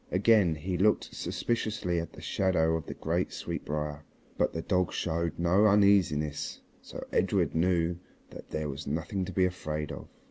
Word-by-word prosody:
Again 95 -3 +4
he 90 +3 -3
looked 105 +3 +2
suspiciously 110 -7 -1
at 85 - -6
the - - -11
shadow 80 -4 +1
of 80 - -4
the - - -6
great 85 +3 -1
sweetbrier, 75 0 -4 0.3
but - - +1
the 80 - -4
dog 90 -2 +1
showed 85 +1 -2
no 90 +5 +4
uneasiness, 95 -8 +2 0.2
so - - -8
Edred - - +2
knew 85 0 +1 0.3
that - - -11
there 75 -1 -2
was 70 0 -6
nothing 85 +6 -2
to 95 - -6
be 95 +1 +3
afraid 75 -4 -3
of. 70 - -8
85 Hz, 165 wpm, -29 LUFS, 80-95 Hz, 0.3 s, Again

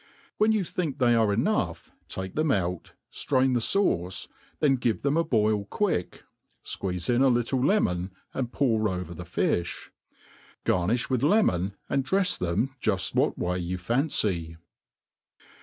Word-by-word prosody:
When 215 +1 +4
you 215 -3 +2
think 165 -4 -3
they 120 -2 +4
are 110 -3 +3
enough 100 - -1 0.2
take 95 0 -6
them 155 0 0
.out, 90 -7 -1 0.2
ftratn 130 -2 +1
the 120 - +2
fauce, 100 - 0 0.3
then 135 -3 +3
give 115 -3 -1
them 140 +1 +2
a 165 - +3
boil 110 -7 +1
quick, 140 - -2 0.4
fqueeze 90 -2 -3
in 120 +1 +2
a 135 - +6
little 125 +1 +1
lemon 95 - +1 0.2
and 125 -2 -3
pour 110 -6 +1
over 90 -2 -4
the 90 +1 -8
fifli. 85 0 -1 0.8
Garnim 110 +8 +1
with 125 -2 +1
lemon> 100 - +2
and 135 - 0
drefs 190 +3 +2
them 95 +10 -1
juft 95 -3 0
what - - +1
way 90 +1 -1
you 90 +1 -3
fancy. 90 - -1
115 Hz, 150 wpm, -27 LUFS, 90-140 Hz, 0.8 s, a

